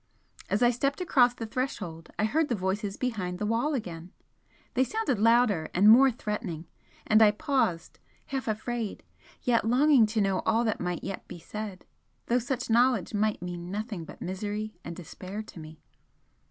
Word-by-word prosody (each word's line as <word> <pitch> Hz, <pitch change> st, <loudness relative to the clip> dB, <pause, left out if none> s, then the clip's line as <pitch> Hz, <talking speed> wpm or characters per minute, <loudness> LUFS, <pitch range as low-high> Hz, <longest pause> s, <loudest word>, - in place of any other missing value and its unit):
As 210 Hz, +4 st, +1 dB
I 240 Hz, -, +6 dB
stepped 275 Hz, +6 st, -1 dB
across 250 Hz, -9 st, +3 dB
the 230 Hz, -, -5 dB
threshold 210 Hz, -9 st, -4 dB
I -, -, 0 dB
heard 305 Hz, +7 st, +1 dB
the 240 Hz, -, +1 dB
voices 195 Hz, +1 st, -2 dB
behind 195 Hz, -8 st, -2 dB
the 210 Hz, -, -2 dB
wall 235 Hz, +8 st, +1 dB
again 175 Hz, -7 st, -6 dB, 0.6 s
they 260 Hz, -, +3 dB
sounded 435 Hz, -, -1 dB
louder 225 Hz, -7 st, +3 dB
and 195 Hz, +4 st, +5 dB
more 255 Hz, +5 st, +8 dB
threatening, 210 Hz, -8 st, -4 dB, 0.4 s
and 215 Hz, +1 st, +5 dB
I 215 Hz, -, +8 dB
paused, 210 Hz, -6 st, -1 dB, 0.3 s
half 270 Hz, -2 st, -4 dB
afraid, 220 Hz, 0 st, -3 dB, 0.4 s
yet 240 Hz, -2 st, +2 dB
longing 250 Hz, 0 st, +5 dB
to 220 Hz, +1 st, -1 dB
know 195 Hz, -2 st, +2 dB
all 225 Hz, +1 st, +1 dB
that 220 Hz, -2 st, -1 dB
might 180 Hz, -1 st, -3 dB
yet 195 Hz, -, -6 dB
be 180 Hz, -, -8 dB
said, 205 Hz, +1 st, -7 dB, 0.4 s
though 245 Hz, +1 st, +2 dB
such 255 Hz, +1 st, -3 dB
knowledge 235 Hz, -4 st, +3 dB
might 210 Hz, -3 st, 0 dB
mean 175 Hz, 0 st, -6 dB
nothing 205 Hz, -2 st, -4 dB
but -, -, -10 dB
misery 205 Hz, +3 st, -4 dB
and 170 Hz, -, -6 dB
despair 185 Hz, +4 st, -7 dB
to 215 Hz, -, -12 dB
me. 155 Hz, 0 st, -12 dB
215 Hz, 170 wpm, -28 LUFS, 185-245 Hz, 0.6 s, more